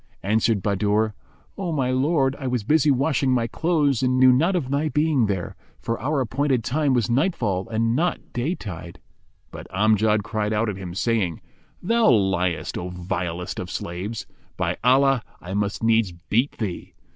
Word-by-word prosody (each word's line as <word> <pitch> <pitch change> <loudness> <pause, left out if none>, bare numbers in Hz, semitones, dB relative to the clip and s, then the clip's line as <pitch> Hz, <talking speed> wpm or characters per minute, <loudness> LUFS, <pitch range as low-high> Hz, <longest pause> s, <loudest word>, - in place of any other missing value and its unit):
Answered 110 0 +1
Bahadur, 105 +2 +1 0.5
"O 180 -3 -2
my 135 -5 0
lord, 135 0 +1
I 135 - -4
was 125 -3 -1
busy 150 +5 +3
washing 135 0 +2
my 120 -2 +2
clothes 145 -1 +1
and 130 0 +2
knew 130 -1 +7
not 165 +9 +2
of 140 -7 -2
thy 145 +2 +1
being 150 -6 +2
here; 95 -4 -3 0.2
for 115 0 -3
our 140 +2 0
appointed 130 0 0
time 140 +2 +1
was 120 -5 +1
nightfall 115 - 0
and 115 +1 0
not 170 +4 -1
day 135 +9 -1
tide." 85 - -8 0.5
But - - -9
Amjad 105 +1 +2
cried 105 0 -2
out 110 +1 +1
at 100 - -3
him, 90 -2 -7
saying, 100 -7 0 0.4
"Thou 230 +4 +3
liest, 95 - +1
O 90 - -5
vilest 90 -1 -4
of 90 - -5
slaves! 95 +7 -5 0.3
By - - 0
Allah, 135 +1 +4 0.2
I 90 +2 -7
must 100 +1 -2
needs 115 -3 +3
beat 105 +10 -1
thee." 100 -6 -5
115 Hz, 170 wpm, -23 LUFS, 100-135 Hz, 0.5 s, knew